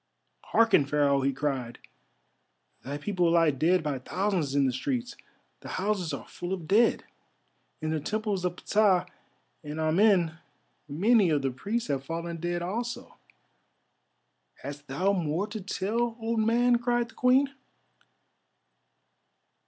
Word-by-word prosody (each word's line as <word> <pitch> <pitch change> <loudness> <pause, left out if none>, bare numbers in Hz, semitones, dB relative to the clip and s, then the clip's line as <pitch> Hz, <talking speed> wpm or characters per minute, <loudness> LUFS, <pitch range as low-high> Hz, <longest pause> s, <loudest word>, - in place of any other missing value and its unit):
"Hearken, 225 -10 +4
Pharaoh!" 140 -1 +2
he 135 +1 +1
cried, 130 -4 -3 1.1
"thy 140 +2 -4
people 180 +1 0
lie 165 -2 +4
dead 160 +6 +2
by 145 -4 -2
thousands 180 -1 -1
in 140 -1 +3
the 130 - +1
streets—the 245 - -6
houses 190 -4 -1
are 140 - -6
full 175 +2 -5
of 175 -5 -5
dead. 220 +6 +3 0.8
In 155 0 -2
the 160 - 0
Temples 210 +3 -2
of 180 -1 -1
Ptah 200 -2 +2 0.6
and 150 +1 -6
Amen 170 0 +3 0.5
many 200 +6 +3
of 145 -3 +1
the 135 - 0
priests 215 - -3
have 135 -1 -1
fallen 165 +2 -4
dead 175 +1 -2
also." 235 +7 -4 1.5
"Hast 145 +1 -8
thou 185 +10 +1
more 170 0 -1
to 215 0 -7
tell, 225 +5 -2
old 225 0 -1
man?" 240 +2 +3
cried 240 0 0
the - - -16
Queen. 265 +3 +3
180 Hz, 130 wpm, -28 LUFS, 150-220 Hz, 1.5 s, Hearken